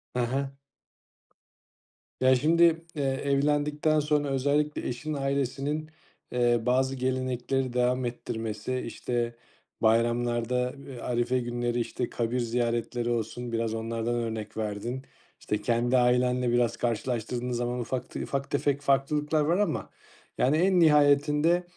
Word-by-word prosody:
He - - 0
he. 135 +4 -1 1.8
Ya, 130 0 +6
şimdi, 165 +4 +3
eee, 145 - -1
evlendikten 145 +3 +1
sonra 150 -1 +1
özellikle 145 +3 0
eşinin 155 +6 -4
ailesinin, 140 +2 -1 0.4
eee, 120 -1 +3
bazı 130 +2 +2
gelenekleri 130 0 -1
devam 125 +1 +1
ettirmesi, 115 0 -3
işte, 120 0 -2 0.5
bayramlarda, 120 +2 +1
eee, 130 -3 -8
arife 120 +1 0
günleri, 120 0 -2
işte, 120 +1 -2
kabir 120 +1 -1
ziyaretleri 120 0 -1
olsun 120 +1 -3
biraz 115 -1 -1
onlardan 115 +1 -2
örnek 110 -2 -4
verdin. 110 +4 -3 0.4
İşte, 105 0 -2
kendi 120 +3 +2
ailenle 125 0 +2
biraz 120 -1 +2
karşılaştırdığınız 120 +1 -2
zaman 120 +1 -2
ufak 125 +1 -3
te - - -5
ufak 140 0 -3
tefek 145 0 +1
farklılıklar 145 +2 +1
var 165 +4 +2
ama, 205 0 -1 0.5
yani, 140 +5 +3
en 185 +2 +3
nihayetinde 150 +2 +4
125 Hz, 120 wpm, -28 LUFS, 120-140 Hz, 1.8 s, Ya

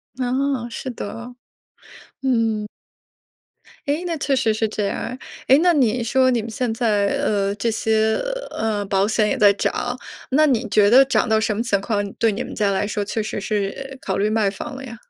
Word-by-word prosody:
啊， 260 0 -1
是 255 - -6
的。 240 +1 -7 0.9
嗯。 225 -5 0 1.2
哎， 295 +5 0
那 335 -2 -2
确 280 -1 0
实 235 -4 +2
是 220 +1 0
这 210 -1 -2
样 - - -3
儿。 250 - -5 0.3
诶， 270 - +7
那 350 +1 +4
你 250 -5 +2
说 255 +3 +3
你 245 -3 +1
们 225 +1 -7
现 240 +1 -2
在， 210 -4 +1 0.2
呃， 200 -1 0
这 225 +3 -1
些， 220 0 +1 0.3
呃， 215 -2 -1
保 195 +1 +1
险 215 -1 +1
也 270 - 0
在 205 -3 +6
涨， 245 +4 -2 0.3
那 305 +3 +5
你 250 -4 +1
觉 205 0 +4
得 265 +4 +7
涨 265 - +1
到 220 0 +3
什 220 -1 0
么 230 - -1
情 205 -4 +1
况 205 -1 -2
对 225 -2 +2
你 210 - -3
们 - - -8
家 205 -2 +1
来 195 +1 0
说 210 0 -2
确 215 +1 -2
实 215 - -4
是 215 +7 -3
考 190 - -2
虑 205 +2 +1
卖 215 -2 +2
房 200 +6 -7
了 270 - -8
呀？ 235 -3 -8
225 Hz, 215 characters per minute, -21 LUFS, 210-255 Hz, 1.2 s, 诶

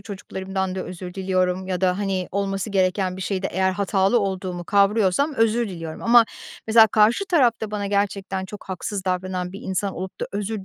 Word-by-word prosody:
çocuklarımdan 190 -2 -4
da 185 - -3
özür 180 0 -8
diliyorum 185 -1 0
ya 185 -1 -2
da, 185 0 +2
hani, 195 -3 -2
olması 195 +1 -2
gereken 185 -1 +1
bir 190 - -5
şeyde 190 0 -2
eğer 190 +1 +1
hatalı 195 +3 +2
olduğumu 185 -3 -3
kavrıyorsam 205 - +2
özür 225 0 +2
diliyorum 165 -3 -7
ama 235 0 +6 0.4
mesela 220 0 +7
karşı 220 - +3
tarafta 240 - +2
bana 205 -1 -3
gerçekten 195 -1 -1
çok 205 +2 -10
haksız 195 +1 -4
davranan 185 -1 -2
bir 200 - -8
insan 190 0 -2
olup 185 +1 -7
da - - -1
özür 205 0 -3
195 Hz, 175 wpm, -23 LUFS, 185-210 Hz, 0.4 s, mesela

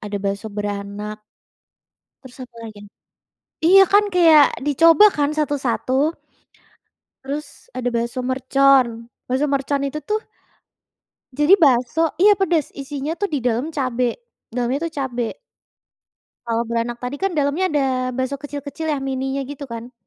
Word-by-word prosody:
ada 205 -1 -5
bakso 200 +2 -3
beranak. 205 0 -5 1.0
Terus 260 -1 -14
apa 240 - -31
lagi 220 -2 -10
ya? - - -17 0.8
Iya 390 +3 +8
kan 410 +1 +7
kayak 320 -5 +7 0.2
dicoba 330 +7 +6
kan 290 -1 +2
satu-satu. 280 -5 -1 1.3
Terus 285 +2 -7
ada 255 -1 -3
bakso 235 +2 -2
mercon, 255 -2 +2 0.2
bakso 260 +3 0
mercon 280 0 0
itu 300 +2 -5
tuh 430 0 -1 1.2
jadi 295 +5 +3
bakso 255 +1 +3 0.2
iya, 415 +2 +7
pedes 350 -5 0
isinya 280 +2 -4
tuh 405 - 0
di 290 - +1
dalam 245 +4 0
cabe, 250 -3 -1 0.4
dalamnya 245 +2 -1
itu 335 - -3
cabe. 245 -3 -3 1.1
Kalau 230 0 0
beranak 235 +1 -2
tadi 250 +3 -5
kan 390 0 0
dalamnya 290 +6 +1
ada 295 -2 +1 0.4
bakso 260 +1 -1
kecil-kecil 290 +2 -6
ya 295 - 0
mininya 270 0 -3
gitu 280 -1 -8
kan? 235 +2 -8
270 Hz, 135 wpm, -21 LUFS, 235-295 Hz, 1.3 s, Iya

